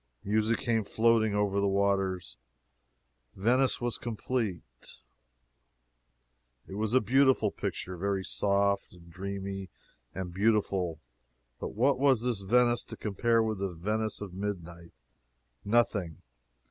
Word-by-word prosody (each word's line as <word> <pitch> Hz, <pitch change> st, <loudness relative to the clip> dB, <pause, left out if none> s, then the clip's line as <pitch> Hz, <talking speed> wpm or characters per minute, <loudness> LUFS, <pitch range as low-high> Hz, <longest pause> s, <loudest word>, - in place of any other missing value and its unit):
Music 110 Hz, +2 st, +1 dB
came 115 Hz, -2 st, 0 dB
floating 110 Hz, 0 st, +2 dB
over 100 Hz, -1 st, +1 dB
the 100 Hz, -, +2 dB
waters 95 Hz, -2 st, 0 dB, 1.0 s
Venice 125 Hz, +7 st, +2 dB
was 120 Hz, -1 st, -2 dB
complete. 105 Hz, -, -4 dB, 1.7 s
It -, -, -9 dB
was 110 Hz, +3 st, -1 dB
a -, -, +7 dB
beautiful 130 Hz, -2 st, +3 dB
picture 95 Hz, -, -4 dB
very 100 Hz, +1 st, -1 dB
soft 100 Hz, -1 st, +1 dB
and 85 Hz, -1 st, -16 dB
dreamy 95 Hz, +1 st, -5 dB, 0.5 s
and 90 Hz, -1 st, -5 dB
beautiful. 95 Hz, -5 st, +1 dB, 0.6 s
But -, -, -5 dB
what 130 Hz, +5 st, +2 dB
was 135 Hz, -4 st, +3 dB
this 120 Hz, -5 st, 0 dB
Venice 120 Hz, +4 st, +3 dB
to -, -, -8 dB
compare 115 Hz, +2 st, +1 dB
with 110 Hz, -3 st, -2 dB
the 100 Hz, 0 st, -1 dB
Venice 105 Hz, +6 st, -2 dB
of 100 Hz, -3 st, -6 dB
midnight? 85 Hz, -4 st, -6 dB, 0.7 s
Nothing. 100 Hz, -7 st, +1 dB
100 Hz, 120 wpm, -30 LUFS, 95-115 Hz, 1.7 s, a